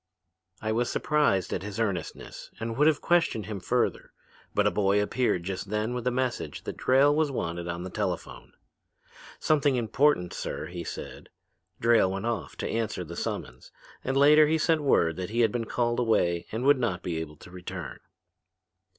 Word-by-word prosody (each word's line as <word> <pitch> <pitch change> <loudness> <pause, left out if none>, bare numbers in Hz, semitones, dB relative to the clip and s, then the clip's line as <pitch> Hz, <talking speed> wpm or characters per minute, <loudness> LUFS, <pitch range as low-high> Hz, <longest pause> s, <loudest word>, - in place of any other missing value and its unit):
"I 110 - 0
was 120 +2 0
surprised 145 - +1
at - - -2
his 100 +2 -6
earnestness 100 -6 -4
and 115 +1 -3
would 150 +5 +4
have 155 -2 +3
questioned 165 -11 +2
him 105 -2 -5
further. 90 - -1 0.4
But - - +3
a - - +4
boy 100 0 +2
appeared 105 -3 0
just 95 +1 -5
then 105 +3 -1
with 125 0 -3
a - - +3
message 125 0 -2
that - - -5
Drayle 135 +3 +4
was 155 -1 +2
wanted 85 -9 -3
at 85 +1 -4
the 95 - -5
telephone. 95 -4 -4 0.8
"Something 145 -3 +2
important, 120 -4 +2
sir," 70 +2 -4
he 85 +1 -6
said. - - -8 0.5
Drayle 115 -5 +4
went 95 +3 -4
off 115 -5 -3
to - - -4
answer 110 -5 -2
the 85 0 -8
summons 60 -5 -5 0.3
and 135 +1 -1
later 150 +2 +7
he 160 +1 +2
sent 160 0 +2
word 85 - +2
that 95 0 -4
he 115 +2 +1
had 115 -2 +4
been 115 0 -2
called 120 +1 0
away 85 -8 +1
and 115 +3 -3
would 140 0 +5
not 90 -8 -1
be 85 -2 -2
able 80 -2 -6
to 90 - -14
return. 90 -6 -7
110 Hz, 185 wpm, -27 LUFS, 90-130 Hz, 0.8 s, later